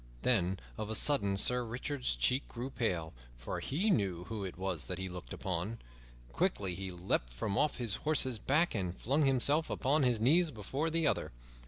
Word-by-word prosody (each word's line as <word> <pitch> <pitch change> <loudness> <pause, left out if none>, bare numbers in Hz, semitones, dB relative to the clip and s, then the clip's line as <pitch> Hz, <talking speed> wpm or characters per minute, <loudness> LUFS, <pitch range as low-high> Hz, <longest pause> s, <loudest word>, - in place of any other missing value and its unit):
Then 95 -6 +2 0.2
of 105 - -3
a 110 - 0
sudden 100 -8 +4
Sir 125 +4 +3
Richard's 125 - -3
cheeks 125 - +1
grew 125 +3 -6
pale, 90 -11 -1 0.2
for - - -5
he 185 +11 0
knew 95 - 0
who 110 +1 -5
it 95 -3 -6
was 95 -6 -2
that 90 - -4
he 95 +1 -3
looked 90 -9 -8
upon. 95 +5 -3 0.5
Quickly 90 +9 0
he 95 +2 -5
leaped 90 -9 -1
from 100 - -3
off 150 +6 +1
his 115 -6 -1
horse's 130 -6 +1
back 155 +9 +2
and 90 -4 -2
flung 140 +5 +1
himself 140 +4 +3
upon 145 +4 +1
his 125 -4 +2
knees 160 +9 +4
before 135 +6 -3
the 165 0 0
other. - - 0
110 Hz, 185 wpm, -33 LUFS, 95-135 Hz, 0.5 s, sudden